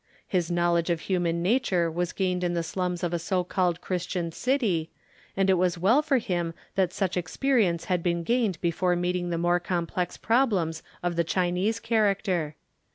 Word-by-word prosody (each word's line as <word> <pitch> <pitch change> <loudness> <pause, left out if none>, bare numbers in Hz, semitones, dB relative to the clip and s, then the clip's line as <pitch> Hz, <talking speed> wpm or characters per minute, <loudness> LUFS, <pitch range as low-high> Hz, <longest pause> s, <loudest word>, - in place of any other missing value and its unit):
His 175 -3 0
knowledge 175 0 +1
of 170 -1 0
human 170 -3 0
nature 185 -6 +2
was 175 +2 -1
gained 180 -2 -1
in 175 -1 0
the 170 - 0
slums 180 +1 -3
of 175 -1 -1
a 170 - 0
so 180 +2 0
called 180 -1 0
Christian 180 -2 -2
city, 210 - 0 0.5
and 195 0 +3
it 190 -2 +4
was 180 -1 +1
well 215 - +4
for 295 -3 +2
him 175 -7 -2 0.2
that 185 -3 +1
such 185 -1 -1
experience 180 0 +1
had 180 -2 0
been 170 -1 0
gained 220 -4 +1
before 175 +1 +1
meeting 175 0 -1
the 170 - -1
more 175 +1 +2
complex 175 0 -2
problems 205 -10 +1 0.2
of 175 -1 -1
the 170 - +3
Chinese 180 +6 0
character. 200 -8 0
180 Hz, 175 wpm, -27 LUFS, 170-195 Hz, 0.5 s, it